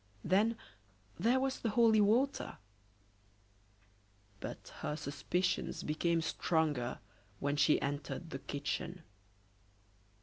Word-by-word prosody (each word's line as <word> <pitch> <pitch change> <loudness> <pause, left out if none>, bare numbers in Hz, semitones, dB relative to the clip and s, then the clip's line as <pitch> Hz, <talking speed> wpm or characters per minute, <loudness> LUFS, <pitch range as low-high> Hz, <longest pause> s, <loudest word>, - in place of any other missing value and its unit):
Then, 215 +5 +3 0.6
there 235 +8 +4
was 270 0 -1
the 230 - -1
holy 220 -1 +5
water! 245 +7 +2 1.8
But - - -7
her 150 - -2
suspicions 170 +5 -1
became 165 +2 +1
stronger 155 -7 0 0.4
when 145 +1 0
she 150 - +4
entered 145 +4 -3
the 135 - -4
kitchen. 150 +5 -4
170 Hz, 95 wpm, -34 LUFS, 145-220 Hz, 1.8 s, holy